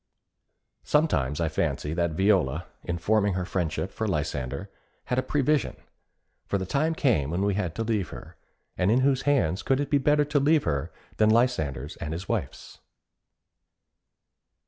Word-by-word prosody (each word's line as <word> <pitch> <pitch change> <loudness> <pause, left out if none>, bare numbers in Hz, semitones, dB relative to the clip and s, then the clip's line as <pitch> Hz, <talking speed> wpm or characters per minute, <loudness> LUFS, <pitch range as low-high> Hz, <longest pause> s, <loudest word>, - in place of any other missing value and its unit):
Sometimes 80 - +1
I 85 - +1
fancy 80 -1 -1
that 85 -1 0
Viola, 90 -4 +2 0.2
in 85 -1 -3
forming 100 +2 +1
her 90 -1 -2
friendship 90 0 -2
for 110 - -3
Lysander, 75 0 -3 0.3
had 125 - 0
a - - +2
prevision; 145 +2 0 0.7
for 100 - 0
the 95 - -3
time 155 - 0
came 110 - +2
when 90 +4 -1
we 100 0 +2
had 95 -5 -2
to 115 - -1
leave 110 -6 -1
her, - - -10 0.4
and 90 +1 +1
in 120 +4 +4
whose 135 -1 +2
hands 95 - +2
could 135 0 +1
it 145 - -2
be 145 - +4
better 145 +2 +3
to 145 0 +1
leave 150 +2 +3
her 70 -1 -2 0.3
than 110 0 +4
Lysander's 80 - +1
and 75 - -4
his 90 +4 -6
wife's? - - -4
100 Hz, 165 wpm, -26 LUFS, 80-130 Hz, 0.7 s, in